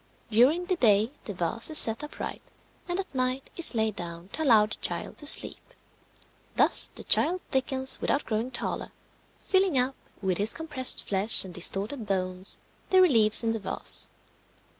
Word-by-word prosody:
During 270 +11 +2
the 370 -1 -3
day 220 -3 +1
the 205 - -7
vase 180 - 0
is 310 - +2
set 225 +2 +7
upright, 295 - -8 0.5
and 350 +1 -4
at 390 - -7
night 255 0 -3
is 340 -7 0
laid 220 -2 -2
down 170 +1 -8
to 315 - -8
allow 225 -8 +3
the 215 - -8
child - - -6
to 295 - -5
sleep. - - +1 1.0
Thus - - +6
the - - -11
child 355 +4 +1
thickens 265 0 -2
without 280 - -2
growing 225 +2 -4
taller, - - -6 0.5
filling 380 -6 -1
up 255 +2 -1 0.2
with 190 -2 -3
his 210 +2 +3
compressed 295 -6 -1
flesh 200 +1 +7
and 185 - -11
distorted 205 +7 0
bones 185 -1 -4 0.3
the 375 - +3
reliefs 230 - +3
in 225 - -1
the 225 - -4
vase. 195 - -1
235 Hz, 165 wpm, -25 LUFS, 205-295 Hz, 1.0 s, set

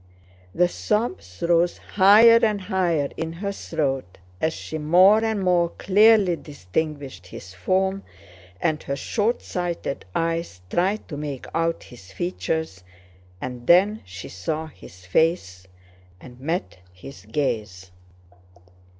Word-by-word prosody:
The 180 - +4
sobs 175 - -3
rose 170 0 +2
higher 215 +4 +6
and 210 -2 +2
higher 175 -6 0
in 165 0 -3
her 200 +4 -4
throat 135 - -3 0.2
as 160 - +2
she 155 0 -6
more 185 +8 +5
and 220 -2 0
more 175 -2 +3
clearly 205 -2 +5
distinguished 145 - -5
his 90 0 -10
form 190 - 0 0.6
and 155 -2 0
her 140 - -3
shortsighted 180 - -2
eyes 165 - -2
tried 195 +5 0
to 145 - -6
make 145 -3 -5
out 165 0 -1
his 100 -6 -14
features, 160 - -3 0.6
and 125 +1 -7
then 200 +5 +5
she 90 +2 -9
saw 155 - -4
his 95 - -15
face 95 - 0 0.5
and 125 +2 -14
met 160 - -3
his 90 +10 -12
gaze. 105 -10 -3
160 Hz, 120 wpm, -23 LUFS, 125-185 Hz, 0.6 s, higher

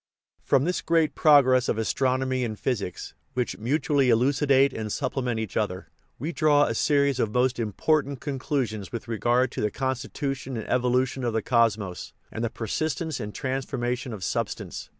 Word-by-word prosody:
From 135 - +2
this 180 +3 -1
great 160 -3 +2
progress 130 -5 +5
of - - 0
astronomy 130 +3 0
and 110 -3 -3
physics, 105 -8 -3 0.2
which 120 -7 -2
mutually 140 +2 +1
elucidate 135 +3 +3
and 110 -1 -4
supplement 125 -2 -2
each 110 -3 -5
other, 95 -4 -2 0.3
we 155 +4 -3
draw 150 -3 +4
a 115 - 0
series 140 +1 +2
of 110 -3 +1
most 125 +1 +1
important 140 +5 0
conclusions 130 -7 -3
with 115 0 -6
regard 120 +3 +1
to - - -4
the 105 - +1
constitution 130 +1 -3
and 110 - -5
evolution 125 +1 +1
of 120 -2 0
the 110 -1 0
cosmos, 110 -7 0 0.2
and 110 - -4
the 115 - 0
persistence 155 - -3
and 105 -2 -6
transformation 130 -2 -2
of 105 -4 -6
substance. - - -3
125 Hz, 160 wpm, -26 LUFS, 115-140 Hz, 0.3 s, progress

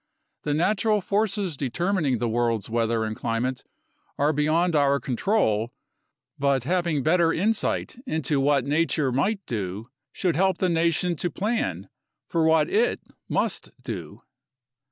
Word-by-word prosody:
The 145 -1 -1
natural 210 +5 +2
forces 200 -3 0
determining 150 +1 0
the 120 - -1
world's 115 -2 0
weather 115 -1 +1
and 110 0 -3
climate 125 +3 -2 0.5
are 145 +2 +2
beyond 160 +4 +2
our 140 -1 +3
control, 120 - 0 0.7
but 140 -2 +2
having 170 -2 0
better 165 +1 +3
insight 215 +6 -1
into 155 - 0
what 140 -1 +2
nature 150 -1 +1
might 195 - 0
do 105 +1 -4 0.2
should 175 -5 -1
help 190 +3 +2
the 185 - +1
nation 170 +1 +1
to 175 - -1
plan 165 - -2 0.4
for 165 - +1
what 160 -1 +4
it 225 +6 +1 0.3
must - - -1
do. - - -7
150 Hz, 135 wpm, -25 LUFS, 125-180 Hz, 0.7 s, what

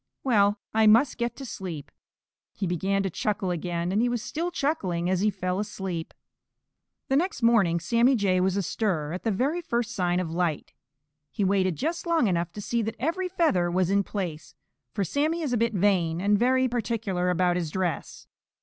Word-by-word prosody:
Well, 205 -5 +3 0.2
I 220 0 +4
must 235 +5 +4
get 235 0 -1
to 275 - -8
sleep." 180 - -7 0.6
He 200 - -2
began 190 +3 0
to 195 - -2
chuckle 195 0 -1
again, 175 0 -2
and 205 +3 +2
he 245 - +2
was 240 -2 -2
still 335 +3 -3
chuckling 210 - -1
as 185 - +1
he 210 +3 +3
fell 185 -2 -2
asleep. 190 -5 -5 0.9
The 270 - +1
next 350 - 0
morning 200 -8 +4
Sammy 235 +9 +3
Jay 190 -5 +2
was 190 +1 +1
astir 180 -5 -1
at 180 - -4
the 225 - -1
very 275 - 0
first 235 -8 -2
sign 180 -3 0
of 175 -3 -3
light. 170 -2 -2 0.6
He 205 - -2
waited 190 -2 +2
just 335 - -3
long 335 -6 +3
enough 170 -2 0
to 210 - -6
see 235 +3 -1
that 225 +1 -3
every 345 +8 -1
feather 315 - +2
was 185 +1 +1
in 200 0 +4
place, 175 -7 -5 0.4
for 205 - -1
Sammy 305 - 0
is 275 -5 -1
a - - +2
bit 230 0 +1
vain, 175 -4 +2
and 205 +3 +3
very 255 +4 +3
particular 215 -6 -1
about 180 0 +2
his 175 -3 -2
dress. 180 -1 -3
200 Hz, 190 wpm, -26 LUFS, 180-240 Hz, 0.9 s, I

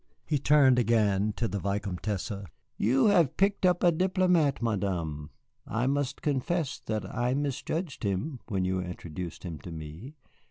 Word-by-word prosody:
He 150 -3 0
turned 135 -3 +5
again 105 -3 +2
to 115 +2 -1
the 100 - -3
Vicomtesse. 100 +1 -2 0.4
"You 130 +6 +3
have 170 -9 +3
picked 195 -1 +3
up 180 -1 +2
a 175 - +6
diplomat, 180 -4 +2
Madame. 90 -10 -2 0.4
I 115 +2 -1
must 140 0 -1
confess 150 +2 -1
that 110 -1 -1
I 125 +2 -1
misjudged 145 +3 -3
him 105 - -2
when 95 -4 -1
you 95 0 0
introduced 90 -1 -6
him 85 -5 -6
to 85 - -9
me. 80 - -8
120 Hz, 150 wpm, -29 LUFS, 95-145 Hz, 0.4 s, a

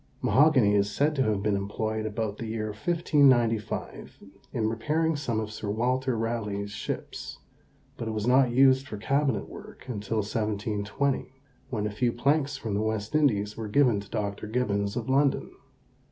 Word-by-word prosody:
Mahogany 130 -8 +4
is 100 0 +2
said 145 +7 +1
to 140 - 0
have 105 -5 +1
been 105 -1 +1
employed 110 +2 -2
about 110 -1 -3
the 115 - -4
year 110 -1 -3
1595 125 - +1 0.3
in 110 -3 0
repairing 155 +9 0
some 120 -6 -2
of 110 -1 -4
Sir 110 -1 -5
Walter 125 +3 0
Raleigh's 105 -3 -2
ships, 105 - -5 0.6
but 115 - -4
it - - -2
was 110 -1 -2
not 130 +1 +5
used 130 +2 +4
for 105 - -6
cabinet 135 -1 0
work - - -12
until 110 -2 -3
1720, 105 +5 -1 0.4
when 110 -5 -2
a 105 - -2
few 120 +4 0
planks 140 +3 +1
from 110 -5 -4
the 100 - 0
West 110 +1 -2
Indies 105 -9 +2
were 110 -1 -5
given 120 -1 +3
to 100 0 -10
Dr. 105 -2 -3
Gibbons 100 -3 -1
of 120 -2 -3
London. 135 +1 +2
110 Hz, 165 wpm, -27 LUFS, 105-130 Hz, 0.6 s, not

